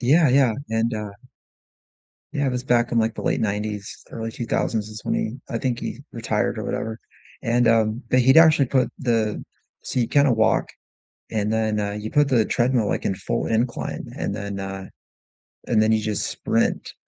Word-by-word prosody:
Yeah, 150 Hz, +5 st, +4 dB
yeah, 130 Hz, -2 st, +4 dB, 0.2 s
and, 115 Hz, +1 st, +1 dB
uh 105 Hz, -1 st, -4 dB, 1.2 s
yeah 145 Hz, -2 st, -1 dB
it 130 Hz, -, 0 dB
was 125 Hz, 0 st, -3 dB
back 120 Hz, -2 st, +2 dB
in 120 Hz, -, +3 dB
the 110 Hz, 0 st, +1 dB
late -, -, 0 dB
‘90s, 105 Hz, -1 st, -3 dB
early 115 Hz, 0 st, -5 dB
2000s 110 Hz, -2 st, -2 dB
is 110 Hz, 0 st, -8 dB
when -, -, -1 dB
he 110 Hz, -, -2 dB
I 115 Hz, -, -2 dB
think 120 Hz, -1 st, -1 dB
he 120 Hz, -, -5 dB
retired 115 Hz, -2 st, -1 dB
or -, -, -3 dB
whatever, 110 Hz, +1 st, -3 dB, 0.4 s
and, 120 Hz, 0 st, +2 dB
um 115 Hz, +1 st, +2 dB
but 130 Hz, -, +4 dB
he'd 130 Hz, +4 st, +5 dB
actually 155 Hz, -4 st, +7 dB
put 130 Hz, 0 st, +1 dB
the 115 Hz, -4 st, 0 dB, 0.4 s
so -, -, -2 dB
you 120 Hz, -, +1 dB
kinda 140 Hz, -2 st, +4 dB
walk 110 Hz, -1 st, +2 dB, 0.6 s
and 110 Hz, 0 st, 0 dB
then, 110 Hz, -1 st, 0 dB
uh, 100 Hz, 0 st, -1 dB
you 105 Hz, +1 st, -5 dB
put 145 Hz, -1 st, +3 dB
the 120 Hz, -4 st, +4 dB
treadmill, 120 Hz, -3 st, +1 dB
like, -, -, -2 dB
in 95 Hz, -, +1 dB
full -, -, -2 dB
incline, 115 Hz, +2 st, -1 dB
and -, -, -2 dB
then, 100 Hz, -1 st, -5 dB
uh, 95 Hz, 0 st, -5 dB, 0.8 s
and 110 Hz, -3 st, +3 dB
then 110 Hz, -, +3 dB
you 110 Hz, -, +3 dB
just 105 Hz, -1 st, -2 dB
sprint, -, -, -1 dB
115 Hz, 185 wpm, -23 LUFS, 110-125 Hz, 1.2 s, actually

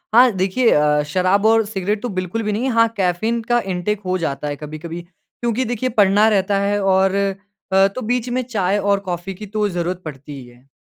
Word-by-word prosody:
हाँ, 245 Hz, 0 st, +7 dB
देखिए 195 Hz, +6 st, +2 dB
अ, 150 Hz, 0 st, +3 dB
शराब 185 Hz, +6 st, +1 dB
और 225 Hz, 0 st, +4 dB
सिगरेट 205 Hz, 0 st, -2 dB
तो 245 Hz, -, -3 dB
बिल्कुल 185 Hz, +3 st, -3 dB
भी 210 Hz, -, -1 dB
नहीं। 235 Hz, +6 st, -1 dB
हाँ, 230 Hz, -1 st, +4 dB
कैफ़ीन 200 Hz, +5 st, 0 dB
का 240 Hz, 0 st, +4 dB
इंटेक 195 Hz, +2 st, -2 dB
हो 185 Hz, 0 st, 0 dB
जाता 150 Hz, -4 st, -3 dB
है 145 Hz, -, -3 dB
कभी-कभी। 155 Hz, +3 st, -7 dB
क्योंकि 230 Hz, +7 st, -5 dB
देखिए 245 Hz, +2 st, -2 dB
पढ़ना 205 Hz, -1 st, +4 dB
रहता 200 Hz, -1 st, +1 dB
है 200 Hz, +1 st, 0 dB
और 190 Hz, 0 st, +3 dB
अ, 195 Hz, 0 st, 0 dB
तो 200 Hz, +6 st, -7 dB
बीच 245 Hz, +1 st, -1 dB
में 250 Hz, +1 st, 0 dB
चाय 205 Hz, -5 st, 0 dB
और 200 Hz, 0 st, +1 dB
कॉफ़ी 185 Hz, -1 st, -5 dB
की 205 Hz, +3 st, -9 dB
तो 210 Hz, +1 st, -1 dB
ज़रूरत 175 Hz, 0 st, -3 dB
पड़ती 145 Hz, -1 st, -8 dB
ही 130 Hz, -, -11 dB
है। 120 Hz, +2 st, -20 dB
195 Hz, 205 wpm, -20 LUFS, 180-220 Hz, -, हाँ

